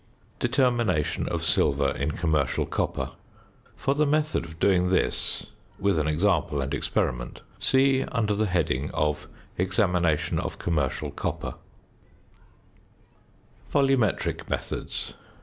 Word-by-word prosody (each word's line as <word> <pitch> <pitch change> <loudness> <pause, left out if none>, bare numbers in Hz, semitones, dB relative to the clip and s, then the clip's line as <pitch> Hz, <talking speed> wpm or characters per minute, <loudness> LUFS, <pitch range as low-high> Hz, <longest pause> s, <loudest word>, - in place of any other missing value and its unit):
~Determination 120 - +1
of - - -2
Silver 70 -1 +3
in 70 +2 -2
Commercial 75 -4 0
Copper.~ - - -2 0.6
For 135 - 0
the 150 +1 +2
method 155 - +1
of 80 -1 -11
doing 90 -1 +3
this, 95 - 0 0.3
with 100 -4 +1
an 75 - 0
example 80 -2 +1
and 70 0 -2
experiment, - - -1 0.2
see 135 0 +4
under 110 -4 0
the 105 +1 +1
heading 75 -6 0
of 75 0 0 0.3
Examination 90 -5 +1
of - - -4
Commercial 75 -6 -1
Copper. - - -3 2.2
VOLUMETRIC 135 -6 +1
METHODS. - - -3
90 Hz, 110 wpm, -26 LUFS, 75-120 Hz, 2.2 s, see